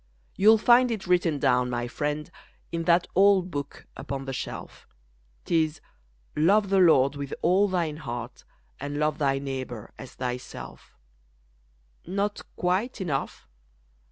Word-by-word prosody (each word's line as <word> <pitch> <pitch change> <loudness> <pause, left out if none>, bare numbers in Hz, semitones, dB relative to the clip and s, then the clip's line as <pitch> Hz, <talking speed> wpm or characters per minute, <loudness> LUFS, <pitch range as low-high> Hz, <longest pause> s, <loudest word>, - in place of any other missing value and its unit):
You'll 215 +3 +6
find 245 +3 +5
it 220 -4 -3
written 175 -4 +2
down, 125 -2 +2
my 120 0 -2
friend, 150 +4 -3 0.4
In 165 0 -3
that 170 0 +4
old 190 -1 +4
Book 145 -1 -6
upon 135 0 -5
the 135 - -4
shelf, - - -7 0.6
'Tis: 160 -2 +1 0.6
Love 195 +6 +3
the 195 - +4
Lord 140 -6 +5
with 140 -1 -5
all 190 +4 +4
thine 170 -5 -1
heart 120 -5 -7 0.4
And 145 +1 -4
love 150 +1 0
thy 135 -2 +2
neighbor 130 -5 -6
as 130 - -10
thyself. 125 -1 -7 1.1
Not 200 +3 -2
quite 190 +9 -1
enough? 150 -8 -3
155 Hz, 130 wpm, -26 LUFS, 135-185 Hz, 1.1 s, You'll